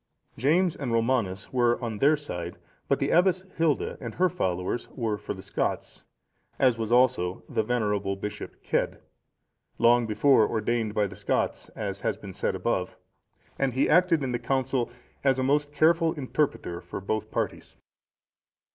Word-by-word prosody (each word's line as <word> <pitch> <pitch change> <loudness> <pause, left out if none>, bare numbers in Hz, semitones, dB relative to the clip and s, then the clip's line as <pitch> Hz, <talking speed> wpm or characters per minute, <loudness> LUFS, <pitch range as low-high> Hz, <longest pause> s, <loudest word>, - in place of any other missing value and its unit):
James 165 +7 +2
and 135 -4 -4
Romanus 115 -5 0
were 120 -1 +3
on 115 -4 -4
their 150 +3 +5
side; 85 -12 -6 0.3
but - - +2
the - - -1
Abbess 185 +2 +3
Hilda 165 -4 0
and 115 -4 -6
her 185 +1 +3
followers 95 - -2
were 115 -4 -1
for 105 0 -6
the 95 - -10
Scots, - - -3 0.5
as 130 -3 +4
was 115 -1 -3
also 120 -8 +2
the - - 0
venerable 105 -4 0
Bishop 105 +2 -6
Cedd,(467) - - 0 0.8
long 120 0 +4
before 110 +2 +4
ordained 110 -1 -1
by 105 - +3
the 100 -1 -7
Scots, - - -1
as - - -4
has - - -1
been - - -9
said - - -1
above, - - -2 0.6
and 135 -2 +1
he 130 - +2
acted 170 -2 +4
in 130 - -1
that 120 - -1
council 130 0 0 0.3
as 135 -2 +3
a 130 - 0
most 145 +2 +1
careful 160 +2 +3
interpreter 130 - -2
for 90 - -6
both 110 +2 -3
parties. - - -4
120 Hz, 160 wpm, -27 LUFS, 105-145 Hz, 0.8 s, their